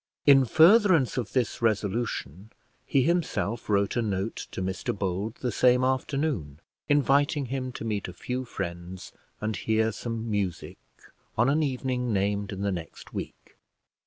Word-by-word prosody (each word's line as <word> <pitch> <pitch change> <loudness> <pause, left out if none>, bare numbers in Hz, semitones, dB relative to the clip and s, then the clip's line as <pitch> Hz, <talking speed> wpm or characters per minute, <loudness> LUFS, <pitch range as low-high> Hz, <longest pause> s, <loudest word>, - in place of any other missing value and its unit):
In 135 -2 +7
furtherance 170 - +5
of 125 -4 -3
this 125 -4 0
resolution, 105 - -1 0.4
he 135 -2 +3
himself 155 - -1
wrote 100 -1 +2
a 120 - +2
note 100 -1 -3
to - - -7
Mr 95 +2 -3
Bold, 100 +4 -2
the 125 - -1
same 125 +3 +4
afternoon, 130 - -1 0.3
inviting 145 0 +3
him 130 -1 -3
to 115 - -6
meet 105 -3 -2
a 90 - -8
few 125 +8 -4
friends 90 -4 -6 0.3
and 110 0 -1
hear 110 0 +1
some 115 +1 -5
music 95 -5 -3 0.6
on 120 +4 +4
an 155 +2 +2
evening 125 -3 -1
named 100 0 0
in 100 -1 -5
the 100 0 0
next 85 -4 -7
week. - - -8
115 Hz, 150 wpm, -27 LUFS, 100-130 Hz, 0.6 s, In